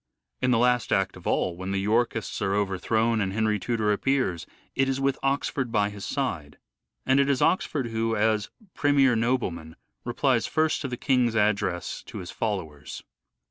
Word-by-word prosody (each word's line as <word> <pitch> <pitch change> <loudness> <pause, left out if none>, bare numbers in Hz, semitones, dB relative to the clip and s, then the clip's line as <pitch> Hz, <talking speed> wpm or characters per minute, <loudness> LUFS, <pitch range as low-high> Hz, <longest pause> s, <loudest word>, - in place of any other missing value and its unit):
In 130 - +2
the 125 - +4
last 125 0 +2
act 95 -1 +1
of 90 - -9
all, 90 - 0
when 95 +2 -6
the 100 - -1
Yorkists 110 +1 0
are 95 0 +1
overthrown 110 +3 +1
and 95 -1 -1
Henry 110 -1 +1
Tudor 110 -1 0
appears, 115 -7 0 0.3
it 135 0 +1
is 135 0 -1
with 135 0 0
Oxford 135 -2 -1
by 105 -2 +1
his 100 -1 -9
side; 85 - -3 0.5
and 135 - +4
it 140 0 +3
is 135 -2 +2
Oxford 150 -7 +1
who, 115 0 -1
as 110 -1 +1 0.2
premier 140 -3 +3
nobleman, 110 -10 -1 0.3
replies 120 0 +1
first 155 0 +1
to 140 - -2
the 125 -2 -5
king's 125 -4 +2
address 100 -4 0
to - - -8
his 90 0 -7
followers. 85 -10 -4
110 Hz, 175 wpm, -26 LUFS, 100-130 Hz, 0.5 s, the